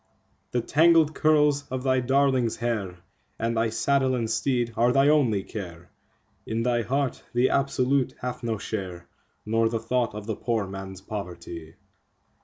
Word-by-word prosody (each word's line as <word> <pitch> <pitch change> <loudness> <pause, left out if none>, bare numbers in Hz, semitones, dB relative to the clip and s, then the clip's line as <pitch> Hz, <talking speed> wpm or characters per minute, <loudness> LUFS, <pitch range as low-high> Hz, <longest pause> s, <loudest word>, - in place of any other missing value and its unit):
The 120 - 0
tangled 160 +3 +4
curls 150 -2 +3
of 130 0 -3
thy 130 -1 +2
darling's 130 -2 +2
hair, 105 -7 -2 0.4
and 115 +1 -1
thy 115 0 +1
saddle 130 +3 +1
and 115 -2 -1
teed 120 0 0
are 120 +2 +3
thy 135 +3 +4
only 125 -10 +3
care; 85 -5 -8 0.6
In 115 +1 -1
thy 120 -1 +1
heart 135 +4 -1
the 125 +2 +3
Absolute 135 -1 +1
hath 125 0 -4
no 115 -2 -2
share, 95 -4 -5 0.4
nor 115 +1 +2
the 115 - -1
thought 115 -1 -1
of 105 -1 -6
the 110 -1 -3
poor 115 -2 -1
man's 95 -1 -8
poverty. 85 -5 -7
120 Hz, 155 wpm, -26 LUFS, 105-135 Hz, 0.6 s, tangled